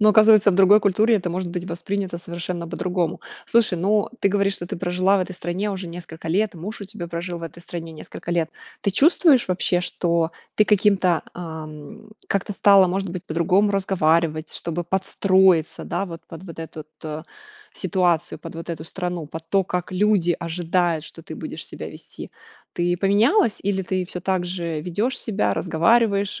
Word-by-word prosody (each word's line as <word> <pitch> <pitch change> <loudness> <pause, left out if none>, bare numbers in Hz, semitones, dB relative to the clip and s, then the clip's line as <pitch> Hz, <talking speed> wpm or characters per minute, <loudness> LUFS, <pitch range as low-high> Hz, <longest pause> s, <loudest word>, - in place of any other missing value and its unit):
Но 215 - +6
оказывается 215 -1 +7
в - - 0
другой 195 +3 +6
культуре 215 +3 +3
это 180 -4 0
может 180 +1 -3
быть 175 0 -4
воспринято 185 +1 -3
совершенно 170 0 -5
по-другому. 175 -1 -2 0.3
Слушай, 225 -6 +3
ну 205 +4 +2
ты 200 - +3
говоришь, 200 0 +1
что 175 - -6
ты - - -5
прожила 185 +2 +2
в - - +1
этой 185 - -3
стране 185 +4 -3
уже 190 -2 -5
несколько 170 -1 -9
лет, 200 +5 +1
муж 190 +7 -7
у 200 - -5
тебя 195 -3 -7
прожил 170 +1 -4
в - - -11
этой 165 +1 -8
стране 165 -1 -7
несколько 160 +2 -8
лет. 165 -2 0 0.3
Ты 200 - +1
чувствуешь 285 - +4
вообще, 180 -1 +1
что 170 -2 0 0.2
ты 210 - +5
каким-то, 195 -5 +3
ам, 155 +1 -8 0.2
как-то 200 +1 -1
стала, 195 -1 +6
может 190 0 -2
быть, 180 0 -6
по-другому 180 +6 +2
разговаривать, 165 -5 +1
чтобы 170 +1 -3
подстроиться, 190 -2 +2
да - - -2
вот 170 -2 -8
под 165 0 -10
вот 165 -3 -10
этот 155 -1 -8 0.2
у 425 - -10
ситуацию, 180 -4 +1
под 165 - -9
вот 165 +1 -7
эту 160 -2 -5
страну, 175 -2 -4
под 160 +2 -9
то 195 -1 +2
как 180 0 -3
люди 185 -3 +2
ожидают, 170 -1 0
что - - -10
ты - - -8
будешь - - -6
себя - - -7
вести? - - -10 0.4
Ты 175 0 +1
поменялась 215 - +3
или 195 0 0
ты 185 0 -1
всё 180 0 -6
также 175 -3 -2
ведёшь 210 +10 -1
себя, 215 -3 0
разговариваешь 200 +4 +2
180 Hz, 175 wpm, -23 LUFS, 170-200 Hz, 0.4 s, оказывается